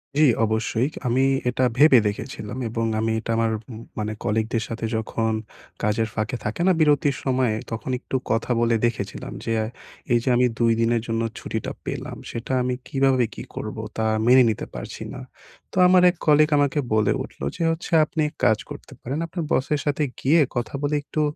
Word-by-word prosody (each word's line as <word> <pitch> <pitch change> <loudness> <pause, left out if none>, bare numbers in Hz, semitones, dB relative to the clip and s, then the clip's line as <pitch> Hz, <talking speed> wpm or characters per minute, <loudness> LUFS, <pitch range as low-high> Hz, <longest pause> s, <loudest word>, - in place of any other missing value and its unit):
জি, 155 - +4 0.2
অবশ্যই 110 +3 0 0.2
আমি 130 +3 +2 0.3
এটা 130 +1 0
ভেবে 145 -3 +7
দেখেছিলাম 105 +2 -5
এবং 115 0 -1
আমি 110 0 0
এটা 115 - -4
আমার 115 -1 +2 0.2
উম 110 +1 -8 0.2
মানে 105 0 -2
কলিগদের 110 +1 0
সাথে 115 0 -4
যখন 110 0 -1 0.5
কাজের 110 +1 +1
ফাঁকে 110 +3 -2
থাকে 110 +10 -3
না - - +6
বিরতির 145 -2 +3
সময়ে? 130 -4 +1 0.2
তখন 115 +3 -4
একটু 135 - -6 0.2
কথা 115 +2 0
বলে 115 0 +3
দেখেছিলাম 105 -4 -3
যে, 115 - 0 0.6
এই 120 - +5
যে 130 - 0
আমি 125 +1 +4
২ 115 -1 +4
দিনের 115 0 +2
জন্য 115 0 -1 0.2
ছুটিটা - - -4
পেলাম, - - -5
সেটা 115 +3 -5
আমি 125 0 0
কীভাবে 135 -2 +2
কী - - -6
করবো? 110 +1 -5 0.2
তা 110 - 0 0.2
মেনে 130 0 +7
নিতে 110 - -2
পারছি - - -7
না। - - -7 0.5
তো - - -8
আমার 180 0 +6
১ 175 - -2
কলিগ 150 0 +5
আমাকে 145 +1 +2
বলে 105 -2 +3
উঠলো 70 - -8
যে, - - -7
হচ্ছে 165 +2 -5
আপনি 160 -1 -3
১ - - -25
কাজ 110 - +4
করতে - - -10
পারেন, 135 +5 -3
আপনার 165 0 -4
বসের 145 +2 +1
সাথে 145 +1 +1 0.2
গিয়ে 155 +4 +4
কথা 120 +2 -2
বলে 145 +1 0
একটু 155 +1 -2
120 Hz, 185 wpm, -23 LUFS, 110-145 Hz, 0.6 s, ভেবে